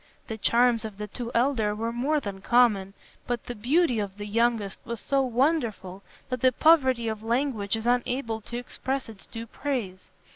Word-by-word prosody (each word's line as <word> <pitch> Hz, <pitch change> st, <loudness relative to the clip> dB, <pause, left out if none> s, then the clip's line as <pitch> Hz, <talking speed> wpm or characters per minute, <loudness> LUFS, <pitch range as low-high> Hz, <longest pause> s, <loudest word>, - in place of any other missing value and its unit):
The 220 Hz, -, -4 dB
charms 235 Hz, +1 st, +3 dB
of 215 Hz, -3 st, -7 dB
the 210 Hz, -, -4 dB
two 230 Hz, +3 st, -6 dB
elder 230 Hz, -4 st, +2 dB
were 225 Hz, +2 st, -2 dB
more 275 Hz, +6 st, +1 dB
than 200 Hz, -7 st, -6 dB
common, 205 Hz, -4 st, +3 dB, 0.3 s
but 245 Hz, -1 st, -2 dB
the 245 Hz, -, -5 dB
beauty 250 Hz, +3 st, +2 dB
of 200 Hz, -1 st, -4 dB
the 205 Hz, -, -5 dB
youngest 225 Hz, -1 st, 0 dB
was 235 Hz, -1 st, -5 dB
so 275 Hz, -1 st, +1 dB
wonderful 240 Hz, -, 0 dB, 0.3 s
that 255 Hz, -2 st, -3 dB
the 255 Hz, -, +5 dB
poverty 260 Hz, -5 st, +4 dB
of 220 Hz, -1 st, -3 dB
language 230 Hz, -3 st, 0 dB
is 225 Hz, 0 st, -5 dB
unable 245 Hz, -1 st, 0 dB
to 235 Hz, +3 st, -6 dB
express 260 Hz, +1 st, -4 dB
its 215 Hz, -3 st, -11 dB
due 230 Hz, 0 st, -7 dB
praise. 230 Hz, -8 st, -4 dB
235 Hz, 180 wpm, -27 LUFS, 210-255 Hz, 0.3 s, the